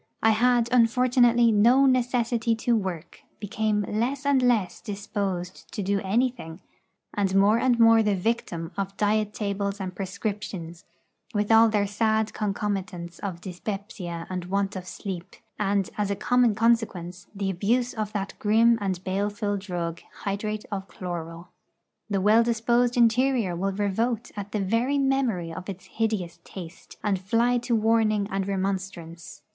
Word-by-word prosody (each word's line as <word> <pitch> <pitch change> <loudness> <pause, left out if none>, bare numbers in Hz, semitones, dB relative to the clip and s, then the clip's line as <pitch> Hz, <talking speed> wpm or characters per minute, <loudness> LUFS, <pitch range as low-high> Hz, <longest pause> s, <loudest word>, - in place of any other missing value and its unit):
I 225 - +6
had, 240 +1 +3
unfortunately, 240 0 +4
no 240 +6 +5
necessity 240 -3 +1
to 235 +1 +1
work, 180 -6 -4 0.2
became 215 0 -1
less 255 +6 -1
and 280 -2 +3
less 235 -7 +1
disposed 200 -4 -4
to 210 - -2
do 200 +1 +1
anything, 205 -5 -1 0.5
and 195 -2 0
more 205 +3 +5
and 245 -2 +2
more 225 0 +7
the 210 -2 +2
victim 180 -5 -2
of 195 0 -3
diet 210 0 +1
tables 200 -1 -3
and 185 -1 -4
prescriptions, 190 -3 -5 0.5
with 205 +1 +1
all 225 0 +7
their 210 -2 +1
sad 220 +1 0
concomitants 195 -4 -3
of 180 -4 -5
dyspepsia 185 -2 -6
and 180 -1 -4
want 195 +2 -1
of 185 -1 -6
sleep, 185 -2 -6 0.2
and, 200 -2 0
as 205 -1 0
a 200 - 0
common 245 +1 +2
consequence, 200 -6 0
the 195 -1 -1
abuse 235 +7 0
of 215 -3 -3
that 200 -2 -3
grim 225 +2 +4
and 190 -2 -2
baleful 205 +2 -1
drug, 175 -4 -4 0.2
hydrate 210 +1 -3
of 195 -1 -4
chloral. 170 -2 -7 0.6
The 200 -2 0
well 215 +4 +5
disposed 235 +1 +1
interior 235 -4 +3
will 195 +3 -1
revolt 220 +4 -1
at 205 0 -6
the 210 - -1
very 230 +8 +1
memory 260 -12 0
of 180 +4 -7
its 190 -1 -7
hideous 195 -7 -2
taste, 170 -4 -10
and 195 -3 0
fly 235 +5 +2
to 240 0 0
warning 215 -2 +2
and 195 0 -1
remonstrance. 190 -3 -4
205 Hz, 150 wpm, -26 LUFS, 190-230 Hz, 0.6 s, more